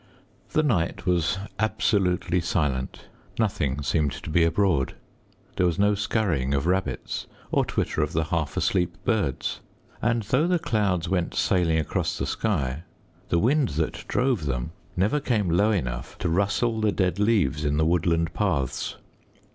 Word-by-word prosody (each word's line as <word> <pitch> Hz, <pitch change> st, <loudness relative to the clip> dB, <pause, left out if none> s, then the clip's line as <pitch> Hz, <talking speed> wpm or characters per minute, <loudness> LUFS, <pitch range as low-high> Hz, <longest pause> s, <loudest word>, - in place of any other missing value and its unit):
The 155 Hz, -, +3 dB
night 100 Hz, -, 0 dB
was 90 Hz, 0 st, +1 dB, 0.2 s
absolutely 95 Hz, -5 st, +1 dB
silent. 75 Hz, -6 st, -2 dB, 0.3 s
Nothing 75 Hz, -, 0 dB
seemed 75 Hz, 0 st, +1 dB
to -, -, -7 dB
be 85 Hz, +1 st, +4 dB
abroad. 85 Hz, -4 st, +1 dB, 0.6 s
There 90 Hz, -, +3 dB
was 85 Hz, -, 0 dB
no 105 Hz, +1 st, +4 dB
skurrying 95 Hz, -, 0 dB
of 70 Hz, -, 0 dB
rabbits, 95 Hz, +2 st, -1 dB, 0.2 s
or -, -, +3 dB
twitter -, -, -1 dB
of 75 Hz, 0 st, 0 dB
the 80 Hz, 0 st, +1 dB
half 75 Hz, -2 st, -2 dB
asleep 90 Hz, -2 st, +1 dB
birds. 105 Hz, -, 0 dB, 0.4 s
And 115 Hz, -1 st, +1 dB
though 130 Hz, +10 st, +2 dB
the 180 Hz, 0 st, +3 dB
clouds 100 Hz, -, 0 dB
went 90 Hz, -1 st, -1 dB
sailing 85 Hz, -4 st, +2 dB
across 80 Hz, -, -1 dB
the -, -, -1 dB
sky, 75 Hz, -, -1 dB, 0.5 s
the 85 Hz, -, +2 dB
wind 130 Hz, -, +3 dB
that 80 Hz, -, -1 dB
drove 125 Hz, -, +1 dB
them -, -, -2 dB, 0.3 s
never 105 Hz, +11 st, +2 dB
came 110 Hz, -, 0 dB
low 100 Hz, +6 st, +3 dB
enough 65 Hz, -, -2 dB
to 90 Hz, -, -1 dB
rustle 100 Hz, +6 st, +1 dB
the 110 Hz, -1 st, +3 dB
dead 95 Hz, -1 st, 0 dB
leaves 100 Hz, -, +2 dB
in 75 Hz, 0 st, +1 dB
the 80 Hz, -, +3 dB
woodland 85 Hz, -1 st, +1 dB
paths. 65 Hz, -3 st, -1 dB
90 Hz, 155 wpm, -25 LUFS, 80-105 Hz, 0.6 s, be